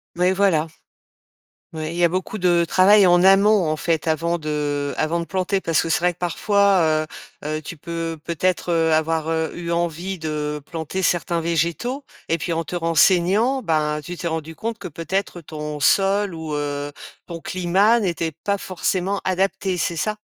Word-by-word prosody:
Oui, 180 Hz, +1 st, +2 dB
voilà. 190 Hz, -5 st, +2 dB, 1.1 s
Oui, 155 Hz, -1 st, -4 dB
il 170 Hz, -, -6 dB
y 175 Hz, -, +1 dB
a -, -, +6 dB
beaucoup 185 Hz, +5 st, -3 dB
de 175 Hz, -2 st, +3 dB
travail 195 Hz, +4 st, +5 dB
en 175 Hz, -1 st, +5 dB
amont, 195 Hz, -2 st, +5 dB
en 155 Hz, -, 0 dB
fait, 165 Hz, 0 st, -1 dB
avant 165 Hz, +2 st, 0 dB
de 145 Hz, -2 st, -2 dB
avant 160 Hz, +2 st, 0 dB
de 170 Hz, -, -3 dB
planter, 190 Hz, +2 st, -1 dB
parce 165 Hz, -3 st, +1 dB
que 165 Hz, -, -4 dB
c'est -, -, +2 dB
vrai 180 Hz, 0 st, +1 dB
que, -, -, -31 dB
parfois, 180 Hz, -3 st, +2 dB, 0.4 s
heu, -, -, -4 dB
heu, -, -, -6 dB
tu 165 Hz, +2 st, -8 dB
peux, 165 Hz, +1 st, -4 dB
peut-être, 175 Hz, +2 st, -1 dB
heu, 165 Hz, -1 st, +2 dB
avoir, 160 Hz, 0 st, 0 dB
heu, 160 Hz, 0 st, -1 dB
eu 170 Hz, -1 st, -5 dB
envie 170 Hz, +2 st, -2 dB
de 150 Hz, -2 st, -3 dB
planter 170 Hz, +3 st, -3 dB
certains 175 Hz, -1 st, +1 dB
végétaux 170 Hz, -, -1 dB, 0.2 s
et 165 Hz, -, +1 dB
puis, 170 Hz, +2 st, -2 dB
en 165 Hz, 0 st, -1 dB
te 180 Hz, -, -6 dB
renseignant, 180 Hz, -, +3 dB
ben, 155 Hz, -6 st, 0 dB
tu 175 Hz, +4 st, -7 dB
t'es 170 Hz, -, -3 dB
rendu 160 Hz, 0 st, -4 dB
compte 225 Hz, +3 st, -4 dB
que 200 Hz, -, -6 dB
peut-être 175 Hz, +3 st, -3 dB
ton 150 Hz, -1 st, -6 dB
sol 195 Hz, +4 st, +2 dB
ou 160 Hz, -2 st, -5 dB
heu, 145 Hz, 0 st, -3 dB, 0.4 s
ton 170 Hz, -1 st, -6 dB
climat 185 Hz, +7 st, +2 dB
n'était 170 Hz, -5 st, -1 dB
pas 200 Hz, 0 st, 0 dB
forcément 190 Hz, +1 st, -2 dB
adaptés, 190 Hz, 0 st, 0 dB
c'est 170 Hz, 0 st, -1 dB
ça? 210 Hz, +7 st, -1 dB
170 Hz, 185 wpm, -22 LUFS, 160-190 Hz, 1.1 s, a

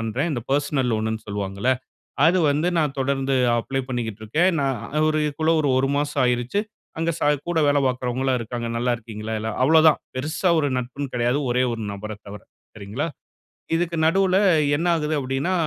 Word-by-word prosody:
பண்றேன். 115 Hz, +8 st, -1 dB
இந்த 120 Hz, -4 st, -3 dB
பெர்சனல் 140 Hz, -2 st, +1 dB
லோன்னு 110 Hz, 0 st, -2 dB
சொல்வாங்கல்ல. 100 Hz, +3 st, -2 dB, 0.6 s
அது 180 Hz, +2 st, +3 dB
வந்து 150 Hz, +4 st, 0 dB
நான் 150 Hz, -3 st, 0 dB
தொடர்ந்து 135 Hz, 0 st, 0 dB, 0.2 s
அப்ளை 135 Hz, +3 st, -2 dB
பண்ணிக்கிட்ருக்கேன். 115 Hz, -, 0 dB
நான் 135 Hz, -2 st, 0 dB, 0.2 s
அதுக்குள்ள 155 Hz, +1 st, +1 dB
ஒரு 145 Hz, -, +1 dB
1 135 Hz, +1 st, +1 dB
மாசம் 145 Hz, -2 st, 0 dB
ஆயிருச்சு. 125 Hz, +9 st, 0 dB, 0.4 s
அங்கே 165 Hz, +1 st, +1 dB
ச -, -, -2 dB, 0.3 s
கூட 165 Hz, -2 st, +1 dB
வேல 145 Hz, 0 st, +3 dB
பார்க்கிறவங்களும் 125 Hz, +1 st, -1 dB
இருக்காங்க. 120 Hz, +1 st, -4 dB
நல்லா 125 Hz, +1 st, +1 dB
இருக்கீங்களா? 110 Hz, -1 st, -7 dB
எல்லா 110 Hz, +1 st, -3 dB
அவ்ளோ 160 Hz, +4 st, +6 dB
தான். 150 Hz, -, 0 dB, 0.2 s
பெருசா 155 Hz, +7 st, -1 dB
ஒரு 145 Hz, -, +1 dB
நட்புன்னு 130 Hz, +2 st, -4 dB
கெடையாது, 120 Hz, +3 st, +1 dB
ஒரே 125 Hz, +1 st, +2 dB
ஒரு 115 Hz, -, -5 dB
நபர 105 Hz, +2 st, -7 dB, 0.2 s
தவர, 100 Hz, 0 st, -9 dB, 0.3 s
சரிங்களா. 105 Hz, +7 st, -4 dB, 0.7 s
இதுக்கு 170 Hz, 0 st, -1 dB
நடுவுல 190 Hz, +2 st, +3 dB, 0.4 s
என்ன 170 Hz, +4 st, -2 dB
ஆகுது 155 Hz, 0 st, -1 dB
அப்டின்னா 135 Hz, +6 st, -1 dB
130 Hz, 160 wpm, -23 LUFS, 115-150 Hz, 0.7 s, அவ்ளோ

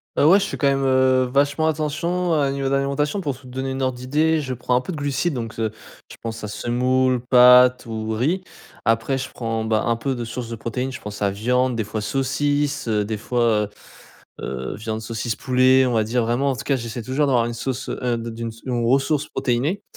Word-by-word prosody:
Bah -, -, +3 dB
ouais, 190 Hz, +5 st, +7 dB
je 200 Hz, -, 0 dB
fais -, -, -5 dB
quand -, -, 0 dB
même, 135 Hz, 0 st, +1 dB
heu, 130 Hz, -1 st, +3 dB
vachement 145 Hz, +3 st, +2 dB
attention 165 Hz, +3 st, -1 dB
à 145 Hz, -3 st, +2 dB
au -, -, -1 dB
niveau 135 Hz, 0 st, -2 dB
de -, -, 0 dB
l'alimentation. 140 Hz, +6 st, 0 dB
Pour 140 Hz, -7 st, -3 dB
te 130 Hz, -, -18 dB
donner 130 Hz, +1 st, -4 dB
une 135 Hz, 0 st, -2 dB
ordre 130 Hz, -1 st, -1 dB
d'idée 155 Hz, +5 st, +1 dB
je 130 Hz, -3 st, -4 dB
prends 125 Hz, +1 st, 0 dB
un 125 Hz, -, +3 dB
peu 155 Hz, -, -6 dB
de 165 Hz, -, -5 dB
glucides, 145 Hz, +3 st, -1 dB
donc, 115 Hz, -2 st, -5 dB
heu, 110 Hz, -1 st, +1 dB, 0.4 s
je -, -, -10 dB
pense 115 Hz, -1 st, -5 dB
à -, -, -3 dB
semoule, 125 Hz, +4 st, +1 dB
pâtes 125 Hz, 0 st, +6 dB
ou 110 Hz, -1 st, -4 dB
riz. 155 Hz, -, 0 dB, 0.4 s
Après 115 Hz, +4 st, +1 dB
je 130 Hz, 0 st, -4 dB
prends, 115 Hz, -2 st, -3 dB
ben, 110 Hz, 0 st, +1 dB
un 115 Hz, -, +2 dB
peu 130 Hz, +3 st, -2 dB
de 120 Hz, -1 st, -4 dB
source 115 Hz, +1 st, -6 dB
de 115 Hz, -, -4 dB
protéines, 125 Hz, +4 st, -3 dB
je 130 Hz, -, -7 dB
pense 105 Hz, -1 st, -8 dB
à 100 Hz, -, +2 dB
viande, 125 Hz, +5 st, 0 dB
des 115 Hz, -, -1 dB
fois 105 Hz, +1 st, -4 dB
saucisse, 145 Hz, +4 st, -1 dB
des 105 Hz, 0 st, 0 dB
fois, 115 Hz, -1 st, +1 dB
heu -, -, -11 dB, 0.7 s
heu, 65 Hz, 0 st, -4 dB
viande, 110 Hz, +1 st, -4 dB
saucisse, 115 Hz, 0 st, -3 dB
poulet, 130 Hz, +2 st, +4 dB
on 125 Hz, -, 0 dB
va 110 Hz, -1 st, +2 dB
dire 115 Hz, +3 st, 0 dB
vraiment, 120 Hz, +5 st, +1 dB
en -, -, -2 dB
tout 115 Hz, -, -6 dB
cas, 140 Hz, -, +1 dB
j'essaie 115 Hz, -1 st, -5 dB
toujours 135 Hz, +5 st, 0 dB
d'avoir 120 Hz, -4 st, +3 dB
une 120 Hz, -, -3 dB
sauce, 130 Hz, +2 st, -4 dB
heu, 120 Hz, -2 st, -1 dB
de 115 Hz, 0 st, -5 dB
d'une 115 Hz, 0 st, -5 dB, 0.2 s
une 120 Hz, -2 st, -1 dB
ressource 140 Hz, +4 st, +2 dB
protéinée, 140 Hz, +11 st, -1 dB
125 Hz, 230 wpm, -22 LUFS, 115-140 Hz, 0.7 s, ouais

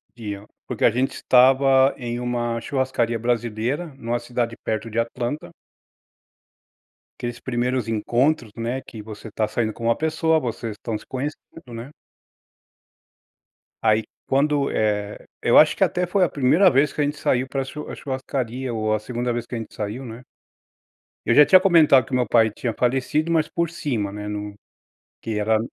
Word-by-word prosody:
dia, 105 Hz, -3 st, -6 dB, 0.2 s
porque -, -, 0 dB
a -, -, +6 dB
gente 130 Hz, +3 st, 0 dB
estava 135 Hz, +1 st, +5 dB
em 120 Hz, -1 st, -4 dB
uma 120 Hz, -1 st, -2 dB
churrascaria 125 Hz, -3 st, -1 dB
brasileira, 120 Hz, +6 st, -1 dB
numa 120 Hz, 0 st, -2 dB
cidade 120 Hz, -1 st, -3 dB
perto 110 Hz, +1 st, -2 dB
de 110 Hz, -, -6 dB
Atlanta 120 Hz, +5 st, -3 dB, 1.7 s
aqueles 120 Hz, 0 st, -4 dB
primeiros 125 Hz, -1 st, -1 dB
encontros, 120 Hz, +2 st, 0 dB
né, 120 Hz, +3 st, -2 dB
que 110 Hz, -3 st, -10 dB
você 110 Hz, +1 st, -9 dB
tá 110 Hz, +1 st, -1 dB
saindo 110 Hz, 0 st, -2 dB
com 115 Hz, -, -10 dB
uma 115 Hz, -, +2 dB
pessoa, 160 Hz, 0 st, +1 dB
vocês 115 Hz, -3 st, -4 dB
estão 115 Hz, -2 st, -4 dB
se -, -, -15 dB
conhecendo, 135 Hz, -1 st, -7 dB
né? 115 Hz, +4 st, -7 dB, 1.9 s
Aí, 110 Hz, 0 st, +3 dB, 0.2 s
quando, 140 Hz, +1 st, +2 dB
eh, 105 Hz, -1 st, -1 dB, 0.2 s
eu -, -, +4 dB
acho -, -, +7 dB
que -, -, +2 dB
até 180 Hz, 0 st, -1 dB
foi 185 Hz, +1 st, +2 dB
a -, -, -2 dB
1ª 155 Hz, +8 st, +4 dB
vez 140 Hz, 0 st, +3 dB
que -, -, -10 dB
a -, -, +3 dB
gente 145 Hz, +1 st, -2 dB
saiu 130 Hz, -2 st, 0 dB
pra 135 Hz, 0 st, -2 dB
chu 150 Hz, +3 st, -8 dB
a -, -, -6 dB
churrascaria, 130 Hz, -2 st, -4 dB
ou 110 Hz, -1 st, 0 dB
a 110 Hz, -, +1 dB
2ª 120 Hz, +2 st, -3 dB
vez 120 Hz, 0 st, -3 dB
que 125 Hz, -, -6 dB
a -, -, -2 dB
gente 110 Hz, -, -7 dB
saiu, 110 Hz, +5 st, -5 dB
né. 115 Hz, +1 st, -9 dB, 1.1 s
Eu -, -, +3 dB
já 150 Hz, 0 st, +9 dB
tinha 185 Hz, +6 st, +7 dB
comentado 160 Hz, -, +5 dB
que -, -, -15 dB
o -, -, +1 dB
meu 125 Hz, -, +2 dB
pai 115 Hz, -2 st, +4 dB
tinha 115 Hz, +2 st, -4 dB
falecido, 135 Hz, +6 st, 0 dB
mas 160 Hz, -2 st, +2 dB
por 170 Hz, -1 st, -1 dB
cima, 125 Hz, -12 st, -3 dB
né, 105 Hz, 0 st, -6 dB
num 105 Hz, 0 st, -5 dB, 0.7 s
que 110 Hz, -2 st, -3 dB
era 110 Hz, +1 st, +2 dB
120 Hz, 175 wpm, -23 LUFS, 115-135 Hz, 1.9 s, já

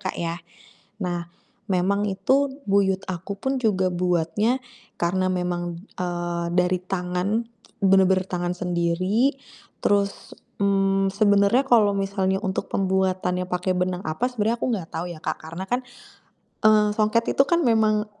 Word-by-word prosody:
Kak, -, -, -4 dB
ya. 170 Hz, 0 st, -2 dB, 0.7 s
Nah, 175 Hz, -1 st, -3 dB, 0.4 s
memang 200 Hz, +2 st, +1 dB
itu 260 Hz, +9 st, +2 dB, 0.2 s
buyut 195 Hz, -1 st, +2 dB
aku 185 Hz, +2 st, -5 dB
pun 265 Hz, +5 st, -2 dB
juga 190 Hz, -5 st, +1 dB
buatnya, 180 Hz, +7 st, +1 dB, 0.4 s
karena 185 Hz, +2 st, 0 dB
memang, 175 Hz, -1 st, -3 dB, 0.2 s
eee, 175 Hz, -1 st, -2 dB
dari 180 Hz, 0 st, +2 dB
tangan, 185 Hz, +4 st, -1 dB, 0.4 s
bener-bener 190 Hz, -1 st, +4 dB
tangan 175 Hz, 0 st, -1 dB
sendiri, 185 Hz, +9 st, +1 dB, 0.5 s
terus, 200 Hz, -1 st, 0 dB, 0.3 s
mmm, 195 Hz, -1 st, +2 dB
sebenernya 205 Hz, +4 st, +4 dB
kalo 215 Hz, -5 st, +4 dB
misalnya 195 Hz, -1 st, 0 dB
untuk 190 Hz, -2 st, -2 dB
pembuatannya 185 Hz, -1 st, 0 dB
pakai 180 Hz, 0 st, -1 dB
benang 180 Hz, 0 st, -1 dB
apa 160 Hz, +11 st, -1 dB
sebenernya 230 Hz, 0 st, 0 dB
aku -, -, -2 dB
gak 175 Hz, -5 st, -6 dB
tau 170 Hz, +2 st, -4 dB
ya, 170 Hz, -, -8 dB
Kak, -, -, -2 dB
karena 165 Hz, +4 st, -6 dB
kan, 245 Hz, +3 st, 0 dB, 0.8 s
eee, 215 Hz, -1 st, +6 dB
songket 215 Hz, +2 st, +1 dB
itu -, -, +5 dB
kan 340 Hz, +2 st, +2 dB
memang, 215 Hz, -2 st, +3 dB
190 Hz, 135 wpm, -24 LUFS, 180-210 Hz, 0.8 s, eee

